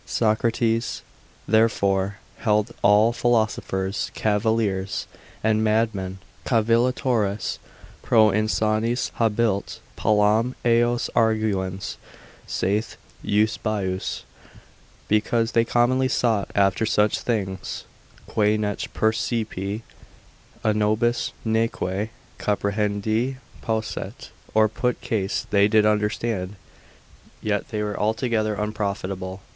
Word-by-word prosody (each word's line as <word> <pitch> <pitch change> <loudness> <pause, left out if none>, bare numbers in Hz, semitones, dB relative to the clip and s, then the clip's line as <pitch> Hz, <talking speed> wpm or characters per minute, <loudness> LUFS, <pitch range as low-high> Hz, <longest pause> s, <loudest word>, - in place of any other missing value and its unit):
Socrates, 115 +1 0 0.4
therefore, 100 -3 +2 0.2
held 105 0 +1
all 105 +3 +5
philosophers, 110 -5 0
cavillers, 105 -3 0 0.4
and 110 0 +2
mad 110 +1 +2
men, 95 -1 -5 0.3
circa 115 -4 +2
subtilia 115 +3 +3
Cavillatores 110 -5 0 0.4
pro 110 -2 +5
insanis 110 +3 0
habuit, 110 -3 +1 0.2
palam 110 +4 +2
eos 120 0 +3
arguens, 105 -4 0 0.5
saith 105 +4 -1 0.2
Eusebius, 105 -3 -1 0.8
because 115 +2 +1
they 115 - +3
commonly 120 +3 +2
sought 115 -6 +1
after 100 +1 +3
such 105 -1 +2
things 95 -5 -3 0.4
quae 105 0 +2
nec 105 -1 -2 0.2
percipi 110 -2 -1 0.8
a 110 -2 +3
nobis 110 +3 +1
neque 110 -2 0 0.3
comprehendi 105 +4 0 0.3
posset, 110 +2 -4 0.2
or 110 0 +6
put 125 +3 -1
case 100 -4 -1
they 100 -1 +5
did 105 0 +4
understand, 105 -2 0 0.8
yet 105 -2 -1
they 105 -1 -2
were 105 -1 -3
altogether 110 0 0
unprofitable. 100 -3 -3
110 Hz, 95 wpm, -24 LUFS, 100-115 Hz, 0.8 s, or